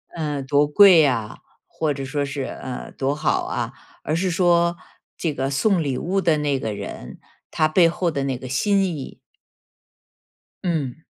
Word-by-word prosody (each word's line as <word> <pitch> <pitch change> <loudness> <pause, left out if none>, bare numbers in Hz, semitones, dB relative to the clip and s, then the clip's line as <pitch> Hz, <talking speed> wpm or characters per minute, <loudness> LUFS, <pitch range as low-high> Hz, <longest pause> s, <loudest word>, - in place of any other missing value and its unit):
呃， 150 -4 -2
多 145 +2 +2
贵 180 +1 +7
呀 125 -7 0 0.3
或 155 -2 -2
者 135 0 -6
说 145 +1 -2
是， 140 -1 -4
呃， 130 -2 -7
多 135 +1 -1
好 150 0 0
啊。 - - -3 0.3
而 155 - -1
是 185 +2 0
说 170 -1 +2 0.4
这 160 -4 -2
个 135 0 -2
送 170 +5 +1
礼 135 -3 -2
物 190 +3 -1
的 160 -4 +2
那 145 -2 0
个 110 -4 -3
人， 60 - -8 0.3
他 155 - +2
背 165 +1 +4
后 170 0 -1
的 140 -2 -2
那 130 -2 -2
个 130 - -9
心 195 +9 +2
意。 155 -7 -6 1.4
嗯。 155 -9 -1
150 Hz, 180 characters per minute, -22 LUFS, 135-170 Hz, 1.4 s, 贵